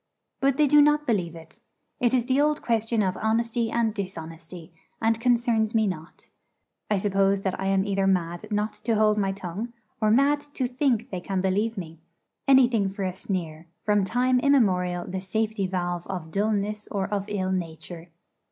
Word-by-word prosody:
But 270 -1 +2
they 300 - +5
do 295 +1 +6
not 295 0 +3
believe 180 - -1
it. 165 +5 -13 0.4
It 240 -1 +2
is 250 -3 +2
the 265 +2 +2
old 300 0 +1
question 225 -1 +1
of 185 -1 0
honesty 230 +1 0
and 225 -1 0
dishonesty, 165 -4 -8 0.3
and 225 0 +1
concerns 235 -2 +2
me 220 -1 +4
not. 170 -5 -6 0.6
I 210 - +2
suppose 195 0 +2
that 190 -2 -2
I 190 - -2
am 195 0 +2
either 195 -1 0
mad 175 +1 0
not 210 0 -1
to 230 - +2
hold 215 0 +3
my 195 -1 +1
tongue, 195 +5 -6 0.3
or 215 - +3
mad 280 +6 +4 0.2
to 260 - 0
think 250 -2 0
they 185 -2 -4
can 195 +1 -2
believe 205 +4 0
me 165 -3 -7 0.5
anything 245 -7 +5
for 195 +1 -5
a 185 -1 -1
sneer, 170 -4 -4 0.2
from 205 -1 +2
time 250 +6 +2
immemorial 185 -10 +2
the 185 0 -4
safety 210 +1 -1
valve 175 -2 -3
of 180 -4 -5
dulness 210 +1 -1
or 195 -2 -2
of 200 -1 -2
ill 190 -3 -2
nature. 170 -1 -5
205 Hz, 180 wpm, -26 LUFS, 185-230 Hz, 0.6 s, do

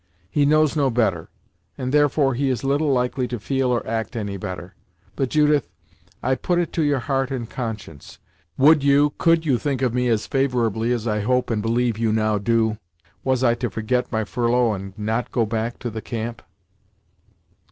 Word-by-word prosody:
He 145 -1 +2
knows 155 0 +3
no 140 -3 +2
better, 110 -9 0 0.5
and, 130 0 -3
therefore, 145 -2 +3
he 135 +3 0
is 125 -1 -2
little 140 +2 +1
likely 125 0 0
to 120 -1 -4
feel 135 +3 0
or 120 -1 +1
to - - -14
act 115 +2 -3
any 100 -3 -3
better; 90 -1 -6 0.4
but, 135 -2 -1
Judith, 150 -2 +2 0.5
I 130 - +2
put 175 +7 0
it 175 -2 -1
to 165 - 0
your 145 -2 +2
heart 135 -2 -1
and 125 -4 -4
conscience 110 - -7 0.4
would 150 +1 +5
you, 140 +1 +4
could 165 -1 +3
you 130 -6 +2
think 135 -3 -2
of 125 -3 +1
me 125 0 +1
as 115 -3 +1
favorably, 120 -4 0
as 120 -2 -1
I 105 -1 0
hope 125 +4 0
and 110 -2 0
believe 115 0 0
you 115 -1 +1
now 110 -1 +1
do, 110 0 +1 0.4
was 130 -1 +1
I 120 -2 +4
to 120 0 -3
forget 125 +3 -1
my 110 -2 0
furlough 120 0 +1
and 95 0 -7
not 110 +3 -2
go 115 -3 +1
back 115 +2 -3
to 120 - -5
the 110 0 -5
camp?" 115 0 -5
125 Hz, 195 wpm, -22 LUFS, 110-135 Hz, 0.5 s, would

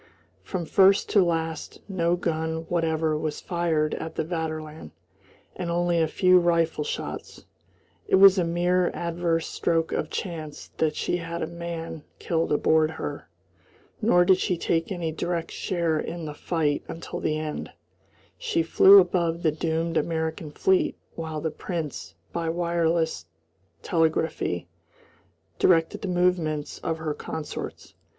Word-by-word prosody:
From 180 -3 -4
first 195 +4 +4
to 200 -3 +5
last 165 -2 -2
no 175 -3 +1
gun 160 -1 -2
whatever 160 -2 +1
was 155 0 -3
fired 165 -4 0
at 160 0 -5
the - - 0
Vaterland, 155 - -5 0.7
and 175 - -4
only 175 0 +1
a 160 - +2
few 180 +3 +4
rifle 165 -3 +1
shots. - - -6 0.6
It - - +4
was 195 0 +8
a - - +3
mere 175 +1 +2
adverse 170 -1 -1
stroke 165 -1 0
of 155 - -2
chance 160 -5 -6
that 155 -1 +1
she 175 - -1
had 170 0 -4
a - - 0
man 170 -2 -6
killed 165 -1 -1
aboard 155 +1 +3
her. 160 - -6 0.7
Nor 175 -5 +4
did 185 0 +5
she 180 - 0
take 165 +2 0
any 170 -4 -2
direct 170 +1 -3
share 170 -4 -1
in 170 0 -5
the 150 - -5
fight 150 -2 -1
until 165 - -6
the 155 0 0
end. 155 -1 -4 0.7
She 165 - 0
flew 190 +4 +8
above 175 -2 +2
the 160 - +3
doomed 165 +2 -1
American 160 -1 -2
fleet 190 +5 +1 0.2
while 160 -2 -5
the 160 - -2
Prince 150 - -5 0.2
by 165 -1 -1
wireless 170 - 0 0.6
telegraphy 160 - 0 0.9
directed 165 -3 +3
the 200 - -3
movements 175 -4 0
of 165 - -2
her 160 -1 -3
consorts. 155 0 -6
165 Hz, 140 wpm, -26 LUFS, 160-175 Hz, 0.9 s, was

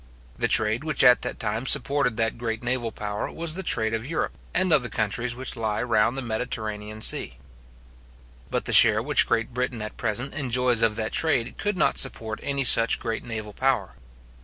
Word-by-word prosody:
The 120 - 0
trade 110 +3 +1
which 155 -3 0
at 125 -1 +6
that - - -5
time 110 +5 -3
supported 140 -4 +1
that 115 0 -1
great 115 -1 -4
naval 125 -2 -1
power 105 -1 -5
was 165 -1 -2
the 190 - -5
trade 110 -11 0
of 110 0 -2
Europe, 165 +6 -3 0.2
and 185 -2 +2
of 150 - +5
the 120 - -5
countries 115 +3 -2
which 130 +1 -6
lie 110 -2 -2
round 115 +1 +1
the 135 - -3
Mediterranean 110 -2 -4
sea. - - +2 1.1
But - - -2
the - - -1
share 110 -1 +7
which 145 +1 +4
Great 115 0 -1
Britain 125 -1 -2
at 110 - -8
present 120 +4 -3
enjoys 125 -4 0
of 110 -2 +2
that 110 -1 -3
trade 135 -8 0
could 205 -2 -1
not 155 - +2
support 110 -4 -1
any 140 -1 -1
such 115 -2 +4
great 115 -1 -4
naval 110 -2 -6
power. 130 -7 0
120 Hz, 190 wpm, -25 LUFS, 110-135 Hz, 1.1 s, share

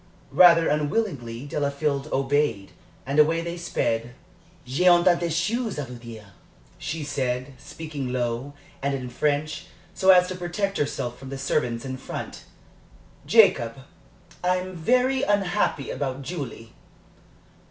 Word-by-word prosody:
Rather 170 -2 +7
unwillingly, 145 - -1
Delafield 145 -1 -1
obeyed, 135 -7 0 0.3
and 140 +4 0
away 165 +2 +4
they 170 0 -4
sped. 120 -8 -2 0.5
"J'ai 140 +9 +1
un 175 -1 +7
tas 180 -1 +5
de 170 - -1
choses 210 +7 -1
à 145 - -3
vous 125 -1 -10
dire," 110 -4 -11 0.5
she 155 +2 -4
said, 130 -1 -2
speaking 150 -5 -6
low, 125 +3 -2 0.3
and 140 0 0
in 125 -2 -6
French, 150 +4 -1 0.3
so 190 0 +1
as 180 -1 +7
to 185 - -4
protect 185 +3 -2
herself 125 -4 -2
from 135 - -9
the 135 - -5
servants 125 -3 -1
in 130 -1 -4
front. - - -7 0.8
"Jacob, - - +5 0.7
I'm 185 +1 0
very 255 +9 +2
unhappy 200 - 0
about 135 -1 -3
Julie." 130 -8 -6
145 Hz, 130 wpm, -25 LUFS, 130-175 Hz, 0.8 s, Rather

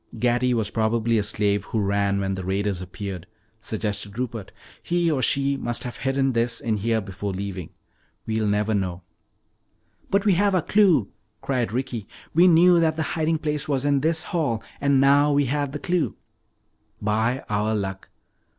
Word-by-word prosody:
"Gatty 120 +2 +2
was 110 -3 -1
probably 115 0 +1
a - - 0
slave 105 -1 0
who 110 - -2
ran 100 0 +1
when 95 0 -1
the 95 -1 -4
raiders 95 0 -1
appeared," 90 -1 -6 0.3
suggested 105 -2 -3
Rupert. 120 -5 -4 0.3
"He 175 -1 +1
or 140 -4 0
she 140 +1 +1
must 120 -2 -3
have 120 - -6
hidden 135 0 +1
this 115 0 0
in 110 -2 -1
here 110 +2 0
before 100 0 -5
leaving. 95 -3 -5 0.6
We'll 110 -1 -1
never 105 +1 +1
know." 95 -3 -2 1.1
"But 200 +1 +1
we've 190 -4 +3
got 200 -1 +3
our 180 - +3
clue!" 180 - +3 0.3
cried 125 -5 -1
Ricky. 120 -3 -3 0.3
"We 175 +3 +6
knew 175 +1 +6
that 160 -1 +2
the 160 - -1
hiding 160 -1 +1
place 150 -1 -2
was 140 -2 0
in 145 -1 +3
this 160 +3 0
hall, 145 -12 -1 0.2
and 140 -1 +3
now 145 +2 +5
we 145 0 +3
have 145 +1 -1
the 150 - -4
clue." 175 +1 -1 0.8
"'By 110 +5 0
our 105 +1 0
Luck.'" 95 -2 -4
115 Hz, 170 wpm, -24 LUFS, 105-145 Hz, 1.1 s, We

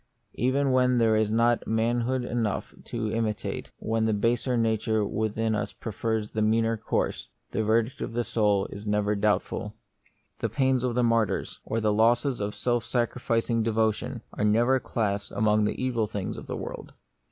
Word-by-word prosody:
Even 135 +2 +1
when 125 -1 +3
there 115 -2 +4
is 110 -1 +2
not 115 +2 +2
manhood 120 +3 0
enough 115 -4 -2
to 110 -2 -3
imitate, 110 -2 -2
when 110 0 0
the 110 -1 +2
baser 120 +3 +1
nature 110 -1 +1
within 110 +1 -1
us 105 - -2
pre 110 - -6
fers 110 0 -2
the 110 - -1
meaner 115 +1 +2
course, 110 - -2 0.2
the 110 - 0
verdict 115 +4 +1
of - - -4
the 120 +1 0
soul 105 -4 +1
is 105 +1 -8
never 105 0 +1
doubtful. 105 +1 0 0.6
The - - -1
pains 130 -2 +1
of 125 -2 0
martyrs, 115 -4 +1
or 115 - -2
the 105 -1 +2
losses 120 +4 +3
of 105 0 -3
self 120 -2 0
sacrificing 120 -1 0
devotion, 110 +2 0
are - - -2
never 120 +5 +3
classed 100 -4 -2
among 105 -1 +3
the 105 - -2
evil 120 -4 0
things 100 -3 -4
of - - -9
the - - -4
world. - - -7
115 Hz, 170 wpm, -27 LUFS, 110-120 Hz, 0.6 s, there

